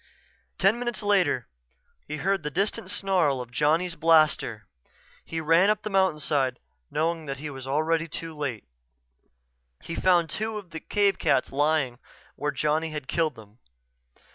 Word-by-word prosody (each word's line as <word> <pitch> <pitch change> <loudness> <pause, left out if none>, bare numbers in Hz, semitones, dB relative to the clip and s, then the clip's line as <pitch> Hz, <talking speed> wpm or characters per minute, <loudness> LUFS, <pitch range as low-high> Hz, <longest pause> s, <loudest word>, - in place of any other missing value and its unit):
Ten 195 +5 +3
minutes 240 -3 -3
later 180 - +2 0.6
he 150 - -4
heard 195 +4 0
the 150 - -3
distant 190 +3 -1
snarl 185 -9 +1
of 125 -1 -7
Johnny's 160 +6 +1
blaster. 155 - +3 0.6
He 165 - -4
ran 165 +5 +4
up 210 0 +1
the 215 - -4
mountainside, 150 -8 +1 0.3
knowing 165 +2 0
already 160 - -12
that 135 0 -4
he 150 +2 -6
was 155 +5 -1
too 165 -1 -8
late. 140 -7 -3 1.2
He 165 - -6
found 175 -1 +3
two 220 0 -3
of 190 -5 -9
the 160 - -5
cave 200 +2 +1
cats 130 - +2
lying 140 -3 +1 0.4
where 150 - -2
Johnny 155 +2 0
had 150 -3 -6
killed 160 -5 0
them. 110 +1 -16
160 Hz, 150 wpm, -26 LUFS, 145-185 Hz, 1.2 s, ran